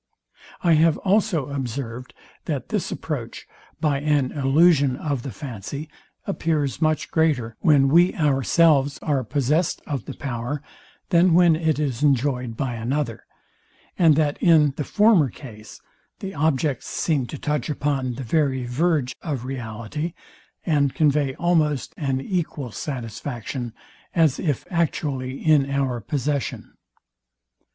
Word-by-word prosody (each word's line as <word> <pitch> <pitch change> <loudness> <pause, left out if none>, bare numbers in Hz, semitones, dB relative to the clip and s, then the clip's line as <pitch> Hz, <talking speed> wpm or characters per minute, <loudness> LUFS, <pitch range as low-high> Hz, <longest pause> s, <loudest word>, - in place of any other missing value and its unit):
I 170 -2 +5
have 160 0 +4
also 190 -7 +2
observed, 125 -2 -5 0.3
that - - -3
this - - -2
approach, - - -5 0.3
by 145 -3 +1
an 145 -3 +1
illusion 145 -1 +3
of 140 -2 -3
the 135 - -6
fancy, 140 +4 -7 0.4
appears 155 - -1
much 155 -1 0
greater, 140 -9 +1
when 145 -4 +4
we 175 +6 +4
ourselves 145 -1 +3
are 140 -4 0
possest 145 +7 0
of 140 -6 -4
the - - -7
power, 135 +2 -4 0.5
than 175 -1 +4
when 175 -2 +6
it 160 -2 0
is 140 -4 -2
enjoyed 130 -4 +1
by 130 -3 -2
another; 120 +1 -3 0.7
and 165 -4 +5
that 150 -1 0
in 155 -5 +5
the 150 - -2
former 205 - +4
case 110 -4 -12 0.4
the 195 -1 -6
objects 145 -3 0
seem 145 -7 0
to 150 - -7
touch 150 -1 -2
upon 140 -4 -1
the 135 - -6
very 130 0 0
verge 140 +1 0
of 140 -7 -4
reality, 130 +6 -5 0.5
and 145 -5 +1
convey 145 -3 +2
almost 155 -6 +1
an 135 -4 -1
equal 150 - -3
satisfaction, 120 -1 -5 0.4
as 160 -5 +3
if 145 -7 -1
actually 140 -6 -1
in 150 -3 +4
our 135 -3 0
possession. 140 +4 -3
145 Hz, 130 wpm, -23 LUFS, 130-155 Hz, 0.7 s, when